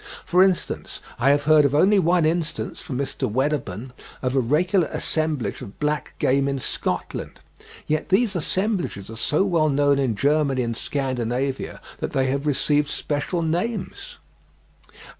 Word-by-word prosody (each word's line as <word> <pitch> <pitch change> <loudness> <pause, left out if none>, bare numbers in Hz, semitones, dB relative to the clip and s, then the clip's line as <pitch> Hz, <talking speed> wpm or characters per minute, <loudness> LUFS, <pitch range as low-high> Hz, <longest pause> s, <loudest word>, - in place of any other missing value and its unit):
For 180 +1 +4
instance, 190 -2 0 0.2
I 130 +3 +4
have 145 0 +3
heard 155 0 +6
of 140 0 +2
only 195 +6 +5
one 175 -1 +3
instance, 165 0 -2
from 130 - -5
Mr. 135 -3 -2
Wedderburn, 130 -3 -2 0.3
of 130 +1 0
a - - +4
regular 160 - +2
assemblage 155 -5 -2
of 100 - -10
black 150 -2 -2
game 140 +1 +2
in 140 0 -1
Scotland, 130 - -4 0.5
yet 155 0 -1
these 200 +1 +3
assemblages 180 - -1
are - - -7
so 145 +9 +1
well 165 -5 +2
known 145 0 +3
in 130 -5 +1
Germany 140 +1 +2
and 115 -1 -2
Scandinavia 130 0 -2 0.2
that - - -4
they 135 - +2
have 140 +2 -2
received 145 +1 +2
special 150 +4 -2
names. 225 - -3
145 Hz, 150 wpm, -23 LUFS, 135-170 Hz, 0.5 s, heard